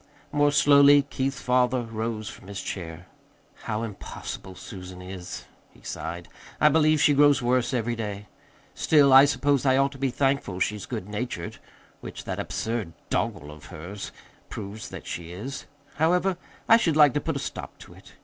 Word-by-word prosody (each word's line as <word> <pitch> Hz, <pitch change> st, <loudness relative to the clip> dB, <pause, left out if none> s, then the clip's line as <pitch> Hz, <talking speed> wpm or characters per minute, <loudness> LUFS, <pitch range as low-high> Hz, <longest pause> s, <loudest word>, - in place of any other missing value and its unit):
More 145 Hz, 0 st, +3 dB
slowly 145 Hz, 0 st, +6 dB
Keith's 135 Hz, -1 st, -3 dB
father 125 Hz, 0 st, +2 dB
rose 110 Hz, -1 st, -4 dB
from -, -, -10 dB
his 100 Hz, -1 st, -6 dB
chair. 85 Hz, -2 st, -6 dB, 0.6 s
"How 110 Hz, +1 st, -2 dB
impossible 95 Hz, -3 st, -7 dB
Susan 90 Hz, -1 st, -9 dB
is," 90 Hz, -1 st, -8 dB, 0.3 s
he -, -, -20 dB
sighed. 85 Hz, +1 st, -6 dB, 0.3 s
"I 150 Hz, -, +6 dB
believe 155 Hz, 0 st, +3 dB
she 145 Hz, 0 st, +5 dB
grows 145 Hz, -2 st, +5 dB
worse 125 Hz, +1 st, +1 dB
every 120 Hz, -2 st, -1 dB
day. 105 Hz, -2 st, -5 dB, 0.5 s
Still 145 Hz, -4 st, +4 dB
I 135 Hz, +1 st, +10 dB
suppose 145 Hz, -2 st, +1 dB
I 130 Hz, -1 st, +4 dB
ought 140 Hz, 0 st, +2 dB
to 135 Hz, -, -12 dB
be 135 Hz, 0 st, +1 dB
thankful 135 Hz, -8 st, 0 dB
she's 105 Hz, +1 st, -1 dB
good 90 Hz, -, -5 dB
natured 105 Hz, -4 st, -5 dB, 0.4 s
which -, -, -8 dB
that -, -, -4 dB
absurd 110 Hz, -7 st, -3 dB, 0.2 s
doggerel 75 Hz, +1 st, -2 dB
of 75 Hz, 0 st, -13 dB
hers 95 Hz, +6 st, -8 dB, 0.4 s
proves 105 Hz, +1 st, -7 dB
that -, -, -9 dB
she 85 Hz, +1 st, -6 dB
is. 130 Hz, +10 st, -7 dB, 0.3 s
However, 180 Hz, +4 st, +2 dB, 0.3 s
I 225 Hz, -, +8 dB
should 165 Hz, -9 st, +1 dB
like 145 Hz, -4 st, +7 dB
to 145 Hz, -, 0 dB
put 160 Hz, -, -2 dB
a -, -, -2 dB
stop -, -, -6 dB
to -, -, -13 dB
it. -, -, -17 dB
120 Hz, 170 wpm, -26 LUFS, 100-140 Hz, 0.6 s, I